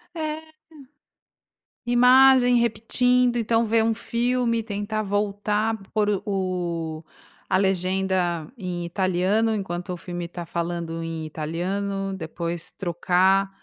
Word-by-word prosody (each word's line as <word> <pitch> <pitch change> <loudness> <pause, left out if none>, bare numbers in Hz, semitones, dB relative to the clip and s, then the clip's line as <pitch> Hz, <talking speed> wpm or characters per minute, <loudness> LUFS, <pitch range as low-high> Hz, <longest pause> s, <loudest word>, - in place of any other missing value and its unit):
É. 310 -1 -3 1.4
Imagem, 250 0 +6
repetindo, 245 +2 +2
então 230 0 +2
ver 225 0 +2
um 225 0 +2
filme 235 +1 0
e - - -3
tentar 210 0 -3
voltar, 210 +2 0 0.2
por 215 -2 +2 0.2
o 175 -5 -2 0.5
a - - +4
legenda 185 -3 0
em 180 -6 -4
italiano 190 +5 +1
enquanto 180 -2 -4
o 180 - -4
filme 175 0 -6
tá 175 0 -7
falando 170 -1 -3
em 165 -1 -4
italiano, 195 +6 -3
depois 170 -1 -5
trocar, 185 +2 +2
195 Hz, 110 wpm, -24 LUFS, 175-225 Hz, 1.4 s, Imagem